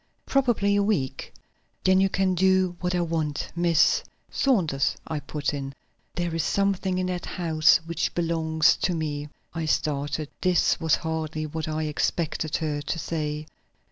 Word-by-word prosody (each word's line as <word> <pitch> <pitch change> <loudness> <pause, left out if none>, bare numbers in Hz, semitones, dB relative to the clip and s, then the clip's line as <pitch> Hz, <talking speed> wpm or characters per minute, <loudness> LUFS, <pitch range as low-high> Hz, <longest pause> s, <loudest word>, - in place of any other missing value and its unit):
"Probably 240 -7 +2
a 205 - +3
week." 140 -11 -1 0.5
"Then 190 0 +4
you 195 - +3
can 190 -1 +1
do 185 0 +3
what 180 0 -1
I 175 - +1
want. 160 -3 -2
Miss 170 -2 +3
" - - -42
"Saunders," 170 - +1
I 155 - -3
put 145 +1 -3
in. 135 -1 -5 0.4
"There 175 -1 -2
is 165 - 0
something 195 -2 0
in 185 - 0
that 180 -1 -3
house 160 -4 +4
which 170 0 -2
belongs 160 -2 +2
to 180 - 0
me." 150 -2 -3 0.2
I 165 -1 -3
started; 150 0 -1
this 180 -2 +3
was 160 -2 +3
hardly 160 -1 -3
what 160 +1 -4
I 155 0 -2
expected 155 +1 -1
her 150 -2 -2
to 150 - -3
say. 150 -2 -3
165 Hz, 160 wpm, -26 LUFS, 150-185 Hz, 0.5 s, Then